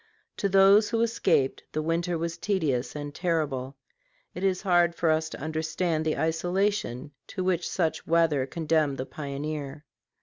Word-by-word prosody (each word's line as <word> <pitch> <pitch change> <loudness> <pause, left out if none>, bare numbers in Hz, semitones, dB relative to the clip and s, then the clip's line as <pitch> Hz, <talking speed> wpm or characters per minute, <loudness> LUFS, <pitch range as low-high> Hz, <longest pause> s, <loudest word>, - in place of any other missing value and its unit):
To 200 - 0
those 195 +2 +6
who 230 -1 0
escaped, 195 - +1
the 155 - 0
winter 170 +2 0
was 165 +1 -3
tedious 160 -11 -1
and 145 -1 -5
terrible. 145 -7 -1 0.6
It 180 - -6
is 190 0 +1
hard 175 -3 +3
for 165 -2 +2
us 160 0 0
to - - -8
understand 160 +1 -1
the 155 - 0
isolation 165 - -1 0.2
to 185 - -4
which 180 -2 0
such 165 -4 -1
weather 160 -5 +2
condemned 155 -2 0
the 130 - -3
pioneer. 145 0 -5
160 Hz, 155 wpm, -27 LUFS, 150-180 Hz, 0.6 s, those